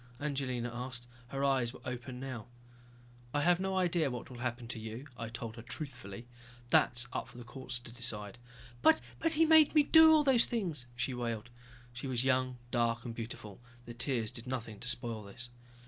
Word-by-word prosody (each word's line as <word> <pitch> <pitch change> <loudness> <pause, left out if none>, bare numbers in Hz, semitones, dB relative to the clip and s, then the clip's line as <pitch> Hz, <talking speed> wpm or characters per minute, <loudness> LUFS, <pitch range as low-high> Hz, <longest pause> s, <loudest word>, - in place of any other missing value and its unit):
Angelina 130 -4 -2
asked. 125 0 -4 0.2
Her 135 +2 -3
eyes 130 -3 +2
were - - -11
open 125 0 -5
now. 130 -5 -6 0.9
"I 145 - +3
have 175 +2 +4
no 190 0 0
idea 175 -4 +2
of 130 - -2
what 125 +1 -6
will 120 - -9
happen 120 -1 -3
to 120 - -3
you," 110 +4 -6
I 115 -1 -5
told 115 -1 -6
her - - -6
truthfully. 120 -6 -7 0.4
"That 120 - +4
is 120 +1 +5
up - - -3
to - - -14
the 120 - -7
courts 125 0 -5
to 120 - -9
decide." 115 -3 -2 0.4
"But - - +6 0.3
he 325 +1 +5
made 315 -1 +6
me 300 - +7
do 320 +2 +8
all 310 -1 +6
those 265 -4 +5
things," 170 - -2
she 125 +2 -1
wailed. 120 -1 -3 0.4
She 125 +3 -5
was 125 -2 0
young, 130 -1 +2
dark 115 -1 +1
and 120 - -4
beautiful, 115 -2 -7 0.2
the 120 - -7
tears 120 -2 0
did 115 +1 -7
nothing 115 -5 -4
to - - -6
spoil 120 -2 0
this. 105 +4 -8
125 Hz, 195 wpm, -33 LUFS, 115-140 Hz, 0.9 s, do